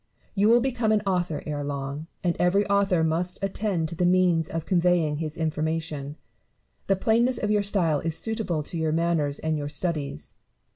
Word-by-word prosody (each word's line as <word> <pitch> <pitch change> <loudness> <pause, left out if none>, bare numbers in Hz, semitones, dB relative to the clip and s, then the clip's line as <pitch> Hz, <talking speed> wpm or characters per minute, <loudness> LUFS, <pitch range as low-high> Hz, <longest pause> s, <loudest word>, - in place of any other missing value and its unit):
You 205 +1 +3
will 240 +1 +6
become 240 -4 0
an 210 -1 +2
author 180 -5 -1
ere 145 -1 -3
long; 140 +2 -4 0.2
and 175 -2 +1
every 195 +3 +3
author 200 -4 +2
must 170 +3 -1
attend 195 -4 -1
to 170 - -5
the 180 - -1
means 180 -3 +3
of 165 -1 -4
conveying 175 -4 +2
his 155 0 -5
information. 155 -2 -2 0.7
The 195 - +3
plainness 235 +5 +2
of 210 - -1
your 210 -1 +3
style 180 -7 +1
is 165 +1 -1
suitable 210 -7 -2
to 165 +3 -5
your 160 -1 0
manners 160 -4 0
and 160 -1 -1
your 145 0 -4
studies. 150 - -3
170 Hz, 180 wpm, -26 LUFS, 155-195 Hz, 0.7 s, will